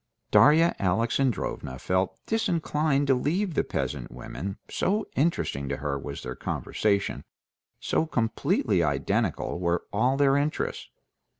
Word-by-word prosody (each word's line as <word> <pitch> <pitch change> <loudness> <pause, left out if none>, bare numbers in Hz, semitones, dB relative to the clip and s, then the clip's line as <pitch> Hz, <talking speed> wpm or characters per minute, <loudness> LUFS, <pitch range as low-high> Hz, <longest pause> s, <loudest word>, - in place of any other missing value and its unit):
Darya 160 +4 +6
Alexandrovna 110 - 0
felt 95 +6 0
disinclined 155 -9 +1
to 135 - +4
leave 165 +9 0
the - - +1
peasant - - -3
women, 90 +10 -6
so 210 +3 0
interesting 130 - 0
to - - -2
her 70 0 -2
was 70 +1 -7
their 65 - -4
conversation, 100 -2 -1 0.6
so 160 - 0
completely 115 -6 +1
identical - - 0
were 85 -1 0
all 125 +6 +2
their 140 -1 +4
interests. 145 +2 -2
125 Hz, 120 wpm, -27 LUFS, 90-155 Hz, 0.6 s, Darya